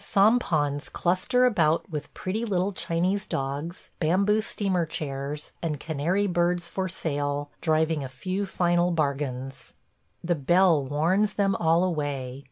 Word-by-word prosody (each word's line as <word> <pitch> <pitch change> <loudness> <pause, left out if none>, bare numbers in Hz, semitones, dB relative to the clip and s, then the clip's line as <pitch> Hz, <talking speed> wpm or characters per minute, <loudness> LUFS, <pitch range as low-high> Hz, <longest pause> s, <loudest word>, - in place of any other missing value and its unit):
Sampans 175 -10 +2
cluster 185 +9 +2
about 165 -10 +2
with 150 -2 -5
pretty 205 +5 -3
little 195 -3 0
Chinese 185 +3 -1
dogs, 140 +6 -4
bamboo 195 +6 +2
steamer 195 -5 -1
chairs, 145 -1 -4
and 155 -4 -2
canary 165 +7 0
birds 175 -1 +1
for 185 +1 -3
sale, 145 -4 -2
driving 160 -2 +1
a 130 - -5
few 185 +10 -3
final 175 -1 +2
bargains.... 140 -4 -3 0.5
The 175 +1 +1
bell 170 +1 +3
warns 170 +9 +1
them 200 -1 +1
all 165 +1 +3
away. 145 -7 -2
170 Hz, 130 wpm, -26 LUFS, 145-185 Hz, 0.5 s, bell